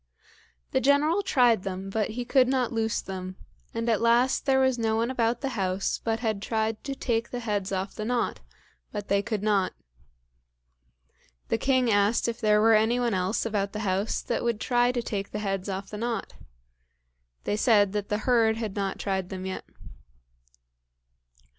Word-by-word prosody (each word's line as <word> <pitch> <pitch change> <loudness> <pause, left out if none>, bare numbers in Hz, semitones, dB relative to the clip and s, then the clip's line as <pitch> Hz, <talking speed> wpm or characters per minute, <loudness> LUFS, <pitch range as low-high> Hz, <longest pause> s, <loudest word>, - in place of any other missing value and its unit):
The - - +1
General 295 - +3
tried 245 - +3
them, 195 0 -5
but 215 0 0
he 245 - -2
could 255 0 +4
not 255 -2 0
loose 225 -1 0
them, 185 -1 -6 0.4
and 230 +1 -3
at 225 -2 +2
last 240 +4 +3
there 265 -1 +4
was 260 -2 +2
no 220 -1 +1
one 230 +3 0
about 235 -2 0
the 275 - -1
house 195 -5 -1
but 225 0 -1
had 215 -4 -1
tried 220 0 -1
to 275 -1 -3
take 235 -3 -1
the 245 - -4
heads 205 -4 -2
off 190 0 -2
the 215 - -5
knot, 240 +2 -1 0.5
but 205 -1 -6
they 200 0 +3
could 210 0 -3
not. 200 -3 +2 1.8
The - - +1
king 260 -3 +2
asked 205 +3 +2
if 235 +1 -3
there 210 -1 +4
were 225 +1 +5
any 220 +3 +3
one 240 -3 +1
else 185 +4 0
about 200 -3 -1
the 215 - -4
house 195 +3 -1
that 235 - -2
would 235 -3 0
try 245 +1 +2
to 245 -1 -2
take 200 -3 -3
the - - -5
heads 195 -2 -2
off 195 0 -5
the 210 - -5
knot. 235 0 -3 1.1
They - - -1
said 210 -3 +4
that 205 -1 -3
the 210 - +1
herd 230 -3 +3
had 220 -4 -4
not 195 -2 -2
tried 190 -2 -2
them 185 -1 -6
yet. 190 - -5
220 Hz, 185 wpm, -27 LUFS, 200-240 Hz, 1.8 s, were